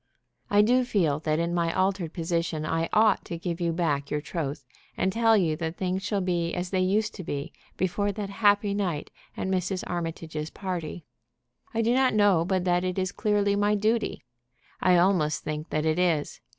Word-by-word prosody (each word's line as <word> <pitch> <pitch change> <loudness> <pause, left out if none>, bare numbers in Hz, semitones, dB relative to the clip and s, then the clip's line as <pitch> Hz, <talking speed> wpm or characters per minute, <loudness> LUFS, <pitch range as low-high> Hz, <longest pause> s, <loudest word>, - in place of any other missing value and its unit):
"I 205 0 +5
do 250 +4 +4
feel 170 -12 +1
that 155 0 0
in 170 +1 -1
my 170 -1 +1
altered 185 -3 0
position 165 -2 -2
I 165 +1 -1
ought 215 -1 +4
to 170 - -5
give 170 +1 -4
you 170 -1 +1
back 155 -5 -1
your 150 - -1
troth, 150 -2 -4 0.3
and 190 0 +1
tell 225 -1 +4
you 165 -5 +1
that 165 +1 -4
things 185 0 -1
shall 200 0 -1
be 175 -2 -1
as 180 0 -3
they 190 - +1
used 205 +4 +1
to 185 - -7
be 145 0 -4 0.2
before 190 +3 0
that 200 -1 -5
happy 205 -1 +3
night 180 -7 -2 0.3
at - - -2
Mrs. 185 0 -1
Armitage's 165 -3 -4
party. 175 -4 -5 0.7
I 230 0 0
do 235 +2 +2
not 260 -3 +3
know 205 -5 +4
but 185 +1 0
that 180 0 +2
it 185 0 -2
is 185 0 0
clearly 205 -1 +1
my 205 +1 +2
duty. 220 - 0 0.6
I 180 -1 +5
almost 175 -4 +2
think 155 +1 -4
that 155 +1 -1
it 160 +2 +1
is. 165 -5 0
180 Hz, 190 wpm, -27 LUFS, 165-205 Hz, 0.7 s, I